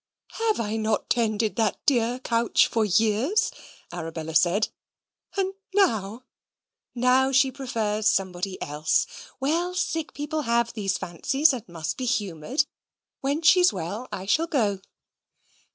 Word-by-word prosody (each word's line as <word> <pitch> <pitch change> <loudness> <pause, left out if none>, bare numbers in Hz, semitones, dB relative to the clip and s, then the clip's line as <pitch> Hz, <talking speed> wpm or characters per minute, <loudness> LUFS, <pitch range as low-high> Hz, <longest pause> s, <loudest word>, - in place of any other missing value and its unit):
"Have 435 - +2
I 220 0 -2
not 220 -1 -1
tended 220 -2 +1
that 220 -3 +1
dear 245 -2 +2
couch 235 -2 +2
for 225 - 0
years?" 225 - +2 0.4
Arabella 160 -2 -5
said, 175 +7 +3 0.7
"and 385 0 0 0.2
now 230 - +1 0.3
" - - -61
"Now 255 +2 +3
she 265 0 +4
prefers 220 -5 -1
somebody 190 -1 0
else. 150 +2 +1 0.3
Well, 335 +6 0
sick 325 -3 -2
people 300 +2 -2
have 235 -2 +1
these 200 -3 -1
fancies, 270 - +1
and 235 -6 -6
must 165 -2 -4
be 255 - -3
humoured. 215 - 0 0.5
When 285 +4 -1
she's 360 +2 +6
well 195 +7 -5
I 190 - -5
shall 320 +11 +2
go." 210 - 0
230 Hz, 135 wpm, -25 LUFS, 195-275 Hz, 0.7 s, she's